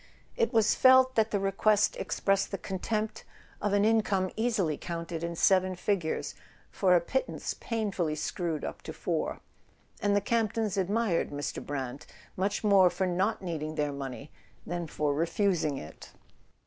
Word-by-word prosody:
It 465 -2 +1
was 225 -3 +4
felt 260 0 +6
that 220 -2 +2
the 205 - 0
request 195 +2 +2
expressed 195 0 0
the 195 - -3
contempt 210 +4 -3 0.4
of 205 - 0
an 205 +1 +3
income 210 -4 +2
easily 215 -9 0
counted 170 0 -5
in 170 0 -3
seven 185 +1 +3
figures 180 -3 -1 0.4
for 185 -2 +3
a - - +6
pittance 265 +10 -2
painfully 200 -9 -2
screwed 165 0 -3
up - - -6
to - - -7
four; - - -2 0.6
and 205 0 +2
the - - +5
Camp 220 +1 0
tons 220 -3 -1
admired 200 -1 +1
Mr. 145 +1 -4
Brant 135 -2 -5 0.3
much 195 +4 -1
more 195 -3 +6
for 180 +2 -1
not 185 +4 0
needing 155 -3 -4
their 150 -2 -1
money 140 +1 -7 0.3
than 175 0 -3
for 150 -1 -1
refusing 165 -1 0
it. 75 - -10
190 Hz, 155 wpm, -29 LUFS, 165-210 Hz, 0.6 s, felt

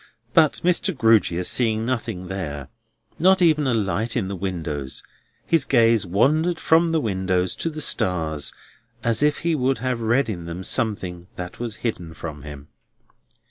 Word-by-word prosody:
But 155 -3 +3
Mr. 180 -1 +1
Grewgious 105 -7 +3
seeing 110 -2 +1
nothing 115 -7 -3
there, 75 -8 -5 0.5
not 190 +3 +5
even 155 -5 +3
a 130 - +1
light 110 +3 -1
in 95 -5 -1
the 100 - -4
windows, 80 -7 -5 0.4
his 165 -4 +2
gaze 115 -6 +3
wandered 155 - +2
from 165 +1 +3
the 165 -1 +1
windows 95 -6 -1
to 165 - -1
the 155 -1 -5
stars, 80 - +2 0.5
as 115 -2 +2
if 150 0 +2
he 170 +1 0
would 135 -3 +1
have 125 0 -2
read 120 +5 +2
in 90 -6 -5
them 85 +2 -6
something 95 -7 -2
that 90 -1 -7
was 115 -3 -3
hidden 85 -8 -3
from 75 -4 -7
him. 75 0 -10
110 Hz, 160 wpm, -23 LUFS, 90-135 Hz, 0.5 s, not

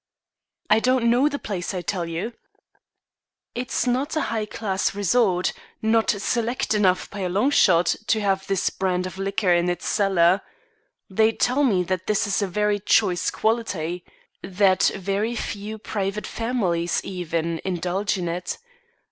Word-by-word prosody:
"I 215 +1 +5
don't 250 -1 +2
know 260 +5 +4
the 285 - -3
place, 195 -6 -4
I 180 - -3
tell 175 -3 -2
you." 175 +8 -4 1.2
"It's 250 +2 -2
not 255 +5 0
a 310 - +1
high 215 -2 -1
class 195 -2 -2
resort; 200 -2 +2 0.3
not 220 0 +2
select 235 +4 0
enough 190 -3 +2
by 205 - -7
a 185 -2 -1
long 205 +10 +2
shot, 175 - +4
to 220 - +2
have 195 -2 0
this 195 -3 0
brand 185 -1 -1
of 185 +1 -7
liquor 195 -1 +1
in 175 +1 +2
its 175 0 -3
cellar. 190 -3 +3 0.7
They 220 +3 +2
tell 255 +6 +1
me 195 -9 +3
that 185 0 -3
this 210 -1 +2
is 205 +1 0
of 195 -2 -2
very 210 +1 +1
choice 190 -3 +2
quality. 180 -7 -1 0.4
That 190 0 +3
very 200 +4 -1
few 215 -1 -5
private 205 -1 -3
families, 190 -8 -1
even, 170 -3 -3
indulge 185 +2 -1
in 175 -2 -3
it. 175 +2 -3
195 Hz, 155 wpm, -23 LUFS, 180-220 Hz, 1.2 s, I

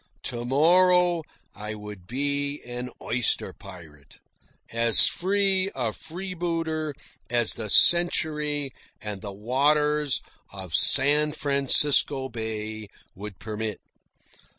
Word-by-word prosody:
To 120 -1 -4
morrow 175 +4 +3 0.3
I 105 +1 -7
would 105 -4 -11
be 140 +3 -1
an 125 +1 -6
oyster 120 -2 0
pirate, 80 -8 -14 0.6
as 115 -1 +5
free 195 0 0
a 120 -4 -2
freebooter 165 - -4 0.3
as 120 -2 +2
the 110 -2 -6
century 150 -3 +3 0.3
and 105 -2 -6
the 100 - -7
waters 145 +7 +1 0.3
of 95 -4 -9
San 150 - +3
Francisco 140 -1 +2
Bay 110 -2 -6 0.3
would 100 -1 -9
permit. 110 0 -5
135 Hz, 100 wpm, -25 LUFS, 110-155 Hz, 0.6 s, as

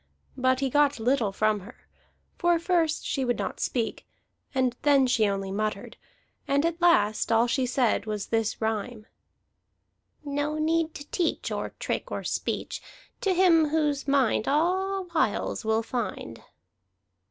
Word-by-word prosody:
But 260 0 +1
he 270 - +1
got 290 -2 +3
little 235 -2 +1
from 215 +1 +1
her; 200 +6 -15 0.5
for 345 0 +3
first 335 -2 0
she 270 - -1
would 245 -1 0
not 195 -2 -4
speak, 230 -3 -2 0.4
and 255 -3 0
then 280 -2 +4
she 235 -4 +2
only 195 -1 -2
muttered, 215 +2 -3 0.5
and 280 +3 +2
at 335 +1 -2
last 215 -12 +3
all 225 +1 +4
she 255 +1 0
said 245 -4 +1
was 210 -2 -3
this 225 -1 0
rhyme: 220 0 -3 1.2
"No 290 +2 -2
need 320 +1 0
to 285 - -9
teach 345 -4 -1
Or - - -4
trick - - -3
or - - -3
speech - - -3 0.4
To 390 - +1
him 335 -4 +5
whose 295 -2 0
mind 265 -6 +2
All 375 +6 +1
wiles 315 - 0
will 220 +1 +1
find." 240 -1 -4
265 Hz, 145 wpm, -27 LUFS, 220-310 Hz, 1.2 s, him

